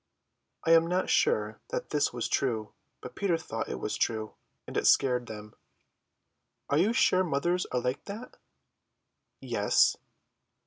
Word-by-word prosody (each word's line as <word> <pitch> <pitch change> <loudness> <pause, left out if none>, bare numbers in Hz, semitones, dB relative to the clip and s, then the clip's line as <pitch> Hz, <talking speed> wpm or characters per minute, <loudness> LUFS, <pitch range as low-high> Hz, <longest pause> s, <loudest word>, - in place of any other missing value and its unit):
I 165 - +2
am 165 0 +6
not 180 +2 0
sure 105 0 +1
that - - -4
this 145 -1 +1
was 120 -2 -3
true, 110 -6 -1 0.3
but - - -9
Peter 190 -4 +1
thought 165 - -5
it 65 - -4
was - - -3
true; 110 -1 -1 0.3
and - - -9
it - - +2
scared 125 -2 +3
them. 105 -1 -9 1.2
"Are 140 - +3
you 200 +6 +3
sure 185 -6 +3
mothers 175 +3 0
are 125 - -1
like 125 +2 -3
that?" 215 +5 -8 1.0
"Yes." - - +2
140 Hz, 145 wpm, -29 LUFS, 110-180 Hz, 1.2 s, am